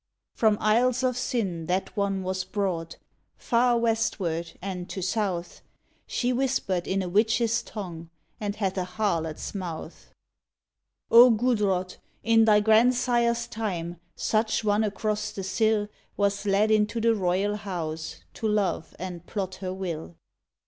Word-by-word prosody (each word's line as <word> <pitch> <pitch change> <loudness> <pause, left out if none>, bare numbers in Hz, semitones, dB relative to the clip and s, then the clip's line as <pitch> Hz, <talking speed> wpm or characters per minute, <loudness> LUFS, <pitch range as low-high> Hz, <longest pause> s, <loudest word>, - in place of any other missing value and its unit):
From 215 -2 +3
isles 240 +4 +2
of 255 -1 +1
sin 195 -10 -2
that 185 +2 -1
one 200 -2 0
was 185 0 -2
brought, 180 -5 -3 0.4
Far 240 0 +2
westward 200 -8 -1
ard 180 -2 -5
to 190 - -5
south; 185 -3 -2 0.5
She 250 0 0
whispered 245 -9 0
in 195 0 0
a - - -4
witch 215 +5 +2
s 230 0 +1
tongue 170 -6 -7 0.3
And 205 -1 -3
hath 195 -3 -1
a - - 0
harlot 180 -5 -1
s - - -6
mouth. 175 -4 -7 1.0
O 240 +2 +9
Gudrod! 210 -6 +1 0.3
in 225 +1 +5
thy 210 -1 +5
grandsire 240 +2 +4
s 235 0 -1
time 175 -7 -4 0.2
Such 220 +1 0
one 210 +1 +2
across 215 0 -1
the 195 - -5
sill 215 +2 +1 0.3
Was 200 0 0
led 205 +2 +3
into 215 +1 +2
the 230 0 +3
royal 195 +1 0
house 165 -6 -5
To 220 - -3
love, 195 -6 -1
and 175 -1 -6
plot 190 -3 -3
her 185 -1 -3
will. 175 -3 -5
205 Hz, 145 wpm, -26 LUFS, 185-225 Hz, 1.0 s, O